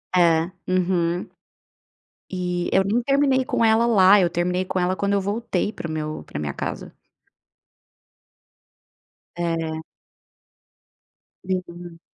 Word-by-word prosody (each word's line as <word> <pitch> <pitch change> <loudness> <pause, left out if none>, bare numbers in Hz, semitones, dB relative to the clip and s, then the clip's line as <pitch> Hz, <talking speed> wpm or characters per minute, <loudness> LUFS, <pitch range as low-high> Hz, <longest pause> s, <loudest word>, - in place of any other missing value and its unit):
É, 170 -1 +3 0.2
uhum. 180 -1 0 1.0
E 180 -1 -2
eu 190 - +4
nem 210 +5 +1
terminei 275 0 +2
com 230 - +1
ela 225 +1 +4
lá, 195 -4 +6
terminei 180 +1 0
com 185 - -2
ela 180 +1 +1
quando 200 +1 -1
eu 200 - +2
voltei 205 0 -2
para 180 - -6
o - - -5
meu 155 0 -4
para - - -7
minha 75 -2 -3
casa. - - -5 2.4
É. 165 -2 -2 1.7
Aham. 175 -2 -5
180 Hz, 115 wpm, -23 LUFS, 170-200 Hz, 2.4 s, lá